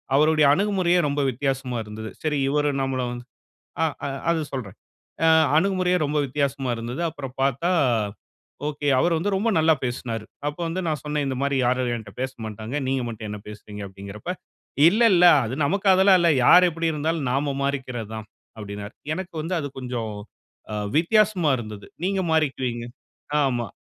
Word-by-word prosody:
அவருடைய 155 +1 +4
அணுகுமுறையே 185 -1 +2
ரொம்ப 145 0 0
வித்தியாசமா 135 -1 -2
இருந்தது. 110 +1 -8
சரி 150 -2 0
இவரும் 145 -1 +1
நம்மளு 130 -1 -1
வ - - -4 0.7
ஆ - - +5 0.2
அ - - -2 0.2
அது 165 -1 +1
சொல்றேன். 120 -8 -5 0.5
அ - - +6 0.3
அணுகுமுறையே 185 0 +2
ரொம்ப 150 +1 0
வித்தியாசமா 135 -1 -1
இருந்தது. 120 +5 -5
அப்பறம் 135 -5 -8
பார்த்தா, 140 +6 +1 1.0
ஓகே, 145 -1 -3
அவர் 170 +4 +2
வந்து 200 +6 -1
ரொம்ப 215 +4 +1
நல்லா 160 0 +5
பேசினாரு. 120 -3 -3 0.2
அப்ப 150 - -3
வந்து 180 +3 -2
நான் 155 -2 -1
சொன்னேன், 150 -1 -1
"இந்த 135 - -2
மாரி 140 0 0
யாரும் 125 -1 +1
என்ட்ட 110 -3 -10
பேசமாட்டாங்க. 110 -2 -5
நீங்க 135 0 0
மட்டும் 110 -2 -6
என்ன 105 0 -5
பேசுறீங்க?" 105 0 -9
அப்படிங்கிறப்ப, 100 - -7 0.6
"இல்ல, 215 +6 0
இல்ல. 180 0 +6 0.2
அது 110 - -4
நமக்கு 195 +6 0
அதெல்லாம் 190 0 +6
இல்ல. 170 - +4 0.2
யார் 180 +5 +8
எப்படி 165 0 -2
இருந்தாலும் 155 -1 -1
நாம 140 +1 0
மாறிக்கிறது 130 -5 -3
தான்" 110 -1 -7 0.3
அப்படின்னார். 105 0 -7 0.2
எனக்கு 185 +1 -6
வந்து 170 +4 -2
அது 145 -2 -4
கொஞ்சம் 120 -4 -4 0.6
அ - - -2 0.2
வித்தியாசமா 185 -1 +3
இருந்தது. 105 -3 -8 0.2
"நீங்க 195 0 0
மாறிக்குவீங்க 130 -6 0 0.6
ஆமா." 120 -3 0
140 Hz, 160 wpm, -24 LUFS, 120-165 Hz, 1.0 s, யார்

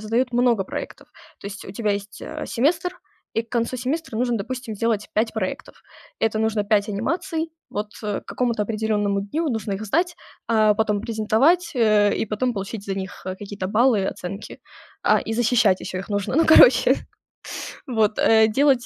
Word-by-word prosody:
задают 235 +4 0
много 240 -5 +2
проектов. - - -7 0.3
То - - -8
есть 200 -1 -7
у 190 - -8
тебя 210 -1 0
есть, 200 0 -6
а, - - -6
семестр, 330 +8 0 0.4
и 225 - +1
к 230 - -26
концу 235 +1 0
семестра 260 0 -3
нужно, 240 -1 0
допустим, 245 +1 -5
сделать 220 -1 -1
5 220 +1 0
проектов. 190 -4 -5 0.4
Это 220 -1 +1
нужно 220 -1 0
5 205 0 +2
анимаций. 325 - -2 0.2
Вот 210 +1 -4
к 210 -2 -3
какому-то 235 -4 -1
определённому 210 -2 0
дню 300 +10 -2
нужно 220 -4 -3
их 200 +3 -4
сдать, 345 - 0 0.3
а 215 -2 +4
потом 210 -2 0
презентовать, 250 +11 +2
э, 215 -3 +4
и - - 0
потом 235 +3 -1
получить 200 +1 -5
за 195 - -2
них 190 -1 -6
какие-то 190 +1 -5
баллы 230 +4 +3
и 190 - -1
оценки. 195 +4 -6 0.4
А, - - +4
и 225 - -4
защищать 230 -5 +3
еще 185 - -5
их 190 - -7
нужно. 205 +2 -2
Ну, 325 - +4
короче 315 - +7 0.9
Вот, 220 -3 +1
э, 220 -1 +5
делать 265 +1 +3
220 Hz, 175 wpm, -23 LUFS, 205-245 Hz, 0.9 s, короче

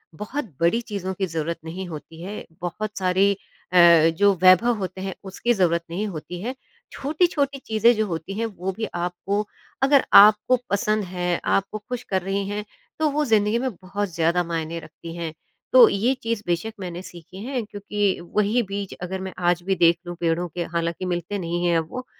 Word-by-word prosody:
बहुत 245 - -4
बड़ी 170 +8 +3
चीज़ों 200 -5 -4
की 190 +1 -1
ज़रूरत 165 -1 -3
नहीं 180 +3 -5
होती 160 0 -9
है, 200 +4 -6 0.2
बहुत 210 +4 -4
सारी 190 +1 +3 0.4
अ, - - +4 0.4
जो 205 +1 +5
वैभव 185 +6 +6
होते 190 -1 -5
हैं, 190 0 -3
उसकी 195 +5 0
ज़रूरत 170 -5 +2
नहीं 195 +6 -2
होती 175 -1 -7
है। 250 +6 -4 0.4
छोटी-छोटी 290 -2 0
चीज़ें 225 +2 +4
जो 215 0 +1
होती 165 +1 -4
हैं 230 - 0
वो 190 -4 -4
भी 220 - -1
आपको, 180 +4 -2 0.4
अगर 275 0 +5
आपको 210 +4 +8
पसंद 210 +1 +1
हैं, 180 -1 -2
आपको 195 +2 0
ख़ुश 245 +3 -6
कर 190 -1 +1
रहीं 195 +2 -2
हैं, 205 +1 -3 0.4
तो 310 -1 +3
वो 300 +1 0
ज़िंदगी 215 -1 +3
में 260 +1 -1
बहुत 195 0 -3
ज़्यादा 170 +2 +2
मायने 165 -1 -3
रखती 165 +1 -10
हैं। 165 -2 -4 0.4
तो - - +10
ये 230 +6 +1
चीज़ 230 -2 -1
बेशक 175 +6 -1
मैंने 180 -2 -5
सीखी 175 0 -12
है 260 -1 -2
क्योंकि 205 -2 -2 0.2
वही 210 +3 +3
बीज 200 -1 -4
अगर 185 +1 -4
मैं 190 0 -6 0.2
आज 175 -1 +1
भी 195 +1 +1
देख 170 -1 +4
लूँ 175 - -5
पेड़ों 170 +1 0
के 175 - -1
हालाँकि 170 +2 -1
मिलते 175 +2 -2
नहीं 175 0 -2
हैं 170 -1 +3
अब 160 -1 -1
वो 255 0 -5
190 Hz, 190 wpm, -24 LUFS, 175-215 Hz, 0.4 s, तो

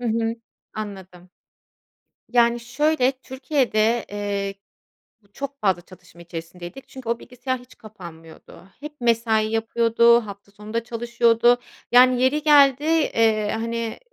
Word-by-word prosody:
Hı 245 - -3
hı. 225 0 0 0.4
Anladım. 190 -4 -9 1.0
Yani, 240 -1 +3
şöyle, 255 +3 +1
Türkiye'de, 255 -4 -1
eee, 200 -1 -3 0.7
bu 200 - -30
çok 280 +1 -7
fazla 190 -4 +1
çatışma 180 -2 -17
içerisindeydik 175 +7 -9
çünkü 260 -3 -9
o 235 0 -1
bilgisayar 255 +1 -5
hiç 250 +1 -18
kapanmıyordu. 170 -3 -13
Hep 295 -1 -10
mesai 225 -2 +2
yapıyordu, 230 +1 +3
hafta 200 0 -11
sonu 210 +2 -12
da 230 - -1
çalışıyordu. 235 0 +2 0.3
Yani 250 0 +6
yeri 295 +3 +1
geldi, 285 -2 +5
eee, 225 -10 +1
hani, 230 0 -4
230 Hz, 125 wpm, -22 LUFS, 205-250 Hz, 1.0 s, Yani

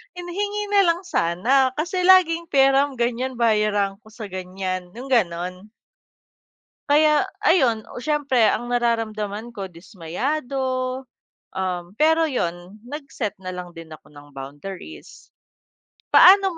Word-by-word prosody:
Hin 355 0 -7
hingi 410 +3 -3
na 405 - +5
lang 335 +2 -5
sana, 245 +11 +2
kasi 350 +4 -2
laging, 340 -3 +5
"peram." 275 0 +3
gan'yan, 245 +2 -1
"Bayaran 210 -3 +2
ko - - -20
sa 220 -1 -8
gan'yan." 185 -1 -5
yung 250 +3 -8
ganon. 185 -2 -1 1.2
Kaya 300 +2 +5 0.2
ayun, 250 - +3
oh, - - -9
s'yempre 275 -6 +2
ang 240 - -1
nararamdaman 230 -2 -2
ko 195 -3 -6
dismayado, 255 - -3 0.5
um, 180 -1 -4
pero 320 +6 +3
yun, 185 - -4
nag 280 +5 -8
set 215 -6 -3
na 185 -1 -7
lang 180 -1 -8
din 165 -1 -10
ako 155 - -15
ng 145 -1 -16
boundaries. 145 - -9 1.1
Paano 385 -2 +7
235 Hz, 125 wpm, -22 LUFS, 185-290 Hz, 1.2 s, Paano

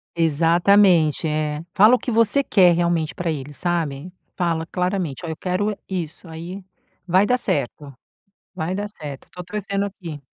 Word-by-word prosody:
Exatamente, 170 +1 +4
é, 150 0 -1
fala 215 +6 +6
o - - -3
que 250 - -3
você 230 +5 +3
quer 180 -7 +5
realmente 170 -2 0
para 170 -2 -2
ele 145 -1 -6
sabe, 165 -1 -2 0.2
fala 165 -2 -1
claramente: 180 -4 -2
"Olha, 165 - -4
eu 160 - -6
quero 195 +3 -1
isso", 175 -2 -5
aí, 175 +4 -8 0.4
vai 185 +3 +4
dar 250 +4 +2
certo, 140 - -3 0.6
vai 180 0 -3
dar 205 +2 -3
certo 150 -9 -9
estou 180 - -9
torcendo 200 +1 -3
aqui. 175 -7 -8
175 Hz, 155 wpm, -22 LUFS, 160-195 Hz, 0.6 s, fala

